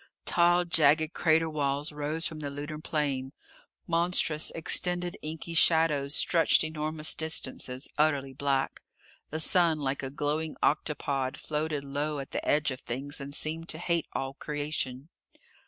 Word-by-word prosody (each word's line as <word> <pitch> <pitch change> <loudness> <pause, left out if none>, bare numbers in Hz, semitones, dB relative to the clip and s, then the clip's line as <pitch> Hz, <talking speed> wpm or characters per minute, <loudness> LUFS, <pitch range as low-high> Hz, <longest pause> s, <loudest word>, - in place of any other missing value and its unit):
Tall, 175 0 +4
jagged 155 -1 +3
crater 160 0 +3
walls 145 -1 -1
rose 150 +2 -2
from 155 -2 -3
the 145 -2 -4
lunar 145 +2 -6
plain. 140 -4 -2 0.5
Monstrous, 165 -2 +2
extended 175 +2 0
inky 160 +2 -5
shadows 160 -4 +3
stretched 165 -2 +4
enormous 155 0 0
distances, 130 -4 -1
utterly 140 -3 +2
black. 135 0 -1 0.5
The 155 - -3
sun, 165 0 +3
like 140 -2 -2
a 135 - -4
glowing 150 +2 -2
octopod, 140 -3 0
floated 150 -1 -2
low 145 +2 -2
at 135 -1 -6
the - - -3
edge 150 -1 +2
of 130 - -6
things 140 +4 -5
and 140 +1 -6
seemed 165 +2 -1
to 155 - -2
hate 170 -1 0
all 135 0 -3
creation. 145 -2 -4
150 Hz, 140 wpm, -29 LUFS, 140-160 Hz, 0.5 s, Tall